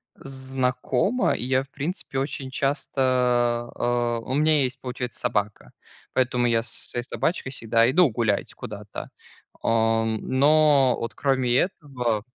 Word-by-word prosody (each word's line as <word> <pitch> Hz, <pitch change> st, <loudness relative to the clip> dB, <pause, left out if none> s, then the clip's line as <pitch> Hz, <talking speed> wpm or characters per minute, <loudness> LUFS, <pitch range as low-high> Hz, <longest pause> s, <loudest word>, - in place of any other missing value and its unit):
Знакомо. 130 Hz, -, -1 dB
И -, -, -2 dB
я, 130 Hz, +1 st, +1 dB
в 135 Hz, -, -20 dB
принципе, 145 Hz, -1 st, -4 dB
очень 135 Hz, -1 st, -4 dB
часто, 140 Hz, 0 st, -1 dB, 0.7 s
а 120 Hz, -1 st, 0 dB
у 120 Hz, +3 st, -5 dB
меня 155 Hz, 0 st, +4 dB
есть, 130 Hz, +1 st, -3 dB
получается, 125 Hz, -1 st, -5 dB
собака. 105 Hz, -4 st, -2 dB, 0.4 s
Поэтому 125 Hz, -1 st, +1 dB
я 115 Hz, -1 st, +2 dB
со 115 Hz, 0 st, -5 dB
с -, -, -3 dB
своей 120 Hz, -, -2 dB
собачкой 130 Hz, +1 st, -2 dB
всегда 115 Hz, -2 st, +2 dB
иду 165 Hz, +3 st, +5 dB
гулять 110 Hz, -3 st, -1 dB
куда-то. -, -, -8 dB, 0.5 s
А, 115 Hz, 0 st, +2 dB
но 135 Hz, +4 st, +3 dB
вот 115 Hz, -1 st, -5 dB
кроме 130 Hz, -3 st, +1 dB
этого. 125 Hz, -, -1 dB
130 Hz, 135 wpm, -24 LUFS, 120-140 Hz, 0.7 s, иду